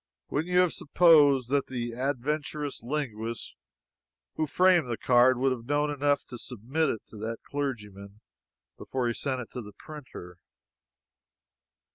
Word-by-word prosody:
Wouldn't 160 +5 -1
you 180 0 +5
have 180 -2 +2
supposed 145 -6 +5
that 140 -1 +2
the 120 -2 -4
adventurous 145 +3 -3
linguist 115 -4 -4 0.8
who 155 - -1
framed 180 -3 +4
the 115 - -2
card 125 +1 +4
would 135 +1 +2
have 120 -2 -4
known 145 +1 +1
enough 145 0 +1
to 120 - -8
submit 130 +8 -2
it 110 - -3
to 110 - -12
that 115 +2 -4
clergyman 105 -8 -5 0.6
before 130 -2 -2
he 120 - 0
sent 130 +1 -3
it 115 - -10
to 125 - -5
the 105 -2 -11
printer? 125 - -10
130 Hz, 145 wpm, -28 LUFS, 115-145 Hz, 0.8 s, you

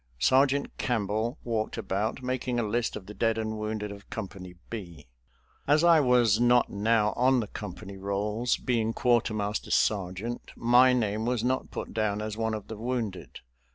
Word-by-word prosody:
Sergeant 135 - +2
Campbell 115 +1 -1
walked 110 -2 -2
about, 105 +6 -2
making 125 -1 -1
a - - +1
list 115 +2 -1
of 95 - -7
the 105 - -9
dead 115 +2 +1
and 110 -1 -3
wounded 105 -1 -3
of 100 0 -12
Company 95 -4 -7 0.2
B. 85 -9 -7 0.6
As 150 +3 +4
I 170 -2 +7
was 125 -5 +4
not 120 0 +4
now 105 +1 +2
on 130 +1 +3
the 115 - -1
company 100 -1 -8
rolls, 105 +5 -1
being 115 -3 0
quartermaster 110 -4 0
sergeant, 100 +4 -1
my 125 +2 +5
name 110 -2 0
was 120 -2 0
not 130 +1 0
put - - -6
down 105 -2 0
as 105 0 -4
one 110 0 -1
of 105 - -7
the 110 - -7
wounded. 115 -4 -4
110 Hz, 165 wpm, -28 LUFS, 105-120 Hz, 0.6 s, I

